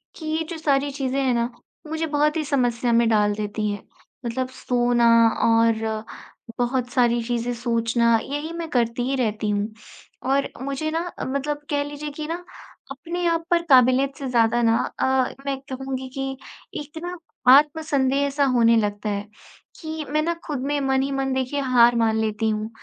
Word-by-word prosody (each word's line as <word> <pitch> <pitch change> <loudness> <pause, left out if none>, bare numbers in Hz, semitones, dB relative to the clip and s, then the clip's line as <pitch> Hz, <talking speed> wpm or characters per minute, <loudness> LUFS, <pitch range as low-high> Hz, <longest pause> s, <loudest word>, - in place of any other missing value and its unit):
कि 320 - -9
ये 315 +1 -1
जो 335 - -5
सारी 285 -2 +1
चीज़ें 270 -1 -2
हैं 260 -2 +2
ना, 235 0 0 0.4
मुझे 320 +1 -2
बहुत 300 +1 +1
ही 315 - 0
समस्या 245 -4 +1
में 235 0 +4
डाल 210 -2 +3
देती 210 0 -2
हैं 205 -1 -6 0.4
मतलब 255 +2 -2
सोना 240 -2 +1 0.4
और 230 -1 +3 0.8
बहुत 245 0 0
सारी 240 -2 +2
चीज़ें 240 +1 -2
सोचना, 235 -1 +2
यही 290 +3 -4
मैं 335 -1 -4
करती 240 -2 0
ही 275 - +1
रहती 215 -4 -1
हूँ 205 0 0 0.6
।और 275 +1 +2
मुझे 275 +3 -2
ना 325 - 0 0.3
मतलब 280 +2 -2
कह 285 -1 +1
लीजिए 290 +1 -6
कि 300 +2 -6
ना 330 - -2 0.6
अपने 340 +6 -4
आप 330 -1 +1
पर 345 -1 +4
काबिलियत 260 +1 +5
से 275 - -5
ज़्यादा 235 -1 +3
ना 230 -1 +3 0.2
अ, - - +2 0.4
मैं 275 -1 -2
कहूँगी 265 0 -4
कि 270 0 -3 0.4
एक 295 +2 -11
ना 355 +1 -5 0.4
आत्मसन्देह 285 -3 +1
ऐसा 280 +1 0
होने 230 -1 +5
लगता 210 0 -1
है, 205 0 -3 0.5
कि 315 -1 -5
मैं 305 +1 +1
ना 335 +2 0
खुद 295 -4 -3
में 290 0 0
मन 265 -1 +1
ही 275 +1 -2
मन 270 -1 -1
देखिए 260 +2 -1
हार 240 -2 +5
मान 225 -1 +2
लेती 220 0 0
हूँ, 215 0 -2
260 Hz, 175 wpm, -23 LUFS, 235-290 Hz, 0.8 s, काबिलियत